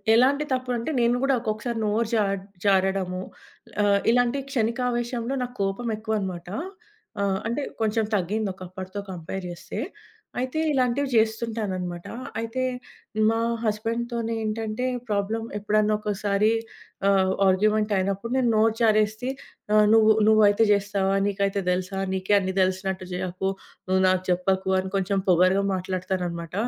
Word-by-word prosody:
ఎలాంటి 275 +5 +4
తప్పు 255 -1 -3
అంటే, 235 - -3
నేను 235 +1 +3
గూడా 275 0 +3
ఒక్కొక్కసారి 225 +1 -2
నోరు 215 +2 +1
జా 215 - +3 0.4
జారడము 190 -1 +1 0.6
ఆహ్, 200 -1 +4
ఇలాంటి 245 +2 +2
క్షణికావేశంలో, 240 +1 -1
నాకు 245 0 -8
కోపం 195 +5 -2
ఎక్కువన్నమాట, 195 -6 -3 0.7
ఆహ్, 195 -1 +1
అంటే 235 +6 -1 0.2
కొంచెం 220 0 +1
తగ్గింది 200 +3 -1
ఒకప్పటితో 185 +1 -7
కంపేర్ 180 +2 -6
చేస్తే. 175 - -8 0.6
అయితే 255 +4 -2
ఇలాంటివి 260 +1 +1
జేస్తుంటానన్నమాట, 220 -6 -1 0.3
అయితే 230 +3 -3 0.7
మా 225 - 0 0.3
హస్బాండ్‌తోనేటంటే 225 0 -2 0.2
ప్రాబ్లమ్, 215 +2 -1
ఎప్పుడన్నా 210 +1 +2
ఒకోసారి 210 0 +1 0.6
ఆహ్, 190 -1 +3 0.2
ఆర్గ్యుమెంటైయినప్పుడు 205 +1 +1
నేను 255 -2 +2
నోరు 220 +1 +3
జారేసి 215 +2 +2 0.5
ఆహ్, 210 - +6
నువ్వు 220 -1 +6 0.2
నువ్వయితే 215 0 +5
జేస్తావా, 200 -1 +1
నీకైతే 200 0 0
దేలుసా, 185 +2 -2
నీకే 190 +2 +1
అన్ని 190 -1 -3
దేలిసినట్టు 185 0 0
చేయకు, 185 +1 -2 0.4
నువ్వు 190 0 +3
నాకు 185 0 +2
చెప్పకు, 190 +1 +1
అని 190 0 -6
కొంచెం 195 0 0
పొగరుగా 185 +3 +4
మాట్లాడతాననమాట. 180 -2 -3
210 Hz, 120 wpm, -25 LUFS, 190-225 Hz, 0.7 s, ఆహ్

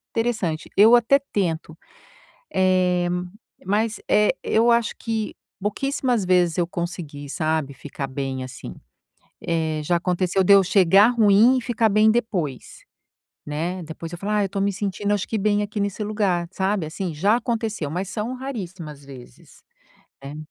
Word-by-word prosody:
interessante. 215 -9 -1
Eu 220 +4 +8
até 240 +3 +4 0.2
tento, 165 -5 -2 0.8
eh, 185 -1 +2 0.6
mas, 210 +3 0
eh, 210 +4 +4
eu 230 +2 +3
acho 235 -2 +1
que 220 -2 -3 0.3
pouquíssimas 245 +1 -1
vezes 180 -2 +2
eu 175 - +2
consegui, 170 -5 -6
sabe, 155 -2 -1
ficar 140 -1 -6
bem 135 -1 -4
assim, 130 - -9 0.7
eh, 160 -2 -1
já 175 +3 +2
aconteceu 180 +2 0
de 200 - +5
eu 195 - +7
chegar 195 +2 +5
ruim 230 +2 +5
e 250 - -4
ficar 230 -2 +1
bem 215 +1 +4
depois, 190 - -3 0.6
né, 165 +5 -3
depois 165 +1 -8
eu 175 - -6
falo: 205 +3 -3
"Ah, 210 -1 +2
eu - - -2
tô 200 - -3
me 200 +1 +2
sentindo 205 +1 -2
acho 200 - -2
que 220 - -1
bem 210 0 +1
aqui 205 0 -4
nesse 200 +1 -2
lugar", 200 -5 0
sabe, 190 -1 -1
assim? 170 +1 -4
Já 200 +9 +3
aconteceu, 225 -9 -2
mas 180 +4 -3
são 225 +3 -3
raríssimas 185 - -7
vezes, 130 - -14 0.6
né. 145 +2 -7
190 Hz, 155 wpm, -23 LUFS, 165-215 Hz, 0.8 s, Eu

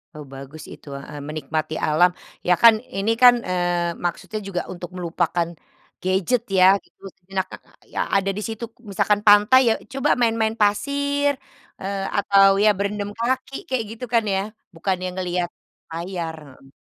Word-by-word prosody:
Oh, 150 - -8
bagus 135 +3 -10
itu, - - -16
heeh, 140 +2 -8
menikmati 155 +1 -3
alam. 155 +4 +5 0.4
Ya 180 - +6
kan 230 -1 +10 0.2
ini 200 +3 +1
kan, 245 -1 +9
eee, 175 -1 0
maksudnya 195 +5 -3
juga 180 -3 -2
untuk 175 -1 -7
melupakan 170 -1 -1 0.6
gadget 190 +6 +1 0.2
ya 185 - +7 0.2
gitu - - -32 0.2
sejenak, 190 +1 -3
ka - - -7 0.4
ya - - -3 0.2
ada 195 0 +2
di - - -3
situ 225 +1 -6 0.3
misalkan 205 +1 +1
pantai 210 +5 +7
ya - - +4 0.2
coba 270 +2 0
main-main 225 -1 +2
pasir, 285 +7 +1 0.5
eee, 195 0 -3
atau 200 -1 +5 0.2
ya 215 - +6
berendam 200 +1 -2
kaki 260 +3 -1
kayak 260 -3 0
gitu 230 +2 -6
kan 230 -1 +4
ya, 190 - +1 0.4
bukannya 185 +2 -2
ngelihat 180 -1 -2 0.4
layar, 170 -1 -4 0.3
heeh. 135 - -18
195 Hz, 155 wpm, -22 LUFS, 175-220 Hz, 0.6 s, kan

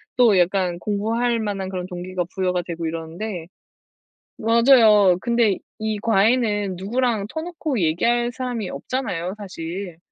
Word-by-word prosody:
또 235 -6 +5
약간 180 0 +1
공부할 225 +5 0
만한 200 -3 -3
그런 185 -2 -4
동기가 180 0 -4
부여가 180 -1 0
되고 170 -1 -5
이러는데 165 +3 -5 0.9
맞아요. 225 -5 +5
근데 235 -5 +2 0.2
이 215 -1 -2
과외는 210 -2 +2
누구랑 220 +2 -1
터놓고 315 -4 -3
얘기할 235 +9 +1
사람이 245 -6 -4
없잖아요, 180 - -3
사실. 180 -2 -6
205 Hz, 290 characters per minute, -22 LUFS, 180-235 Hz, 0.9 s, 또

